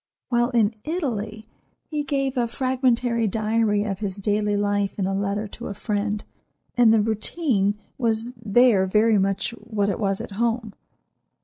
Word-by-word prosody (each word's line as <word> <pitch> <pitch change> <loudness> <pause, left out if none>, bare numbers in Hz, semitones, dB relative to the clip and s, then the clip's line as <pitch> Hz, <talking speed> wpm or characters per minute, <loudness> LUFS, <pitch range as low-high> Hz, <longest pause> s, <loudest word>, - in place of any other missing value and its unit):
While 240 0 +2
in 230 -4 +2
Italy 220 - -3 0.4
he 300 -2 -3
gave 275 -1 -1
a 240 -2 +1
fragmentary 245 -2 +1
diary 215 0 +1
of 200 -3 -3
his 200 -3 -3
daily 205 0 0
life 205 -1 0
in 195 - 0
a 195 - -1
letter 200 +2 -1
to - - -7
a 200 - -5
friend, 210 0 -2 0.5
and 240 -3 +6
the 220 -1 +5
routine 215 - 0 0.2
was 230 0 0
there 225 -3 +3
very 215 +2 +4
much 195 +3 0
what 215 -3 -2
it 195 - -2
was 195 -2 0
at - - -7
home. 230 -2 0
215 Hz, 155 wpm, -24 LUFS, 205-240 Hz, 0.5 s, and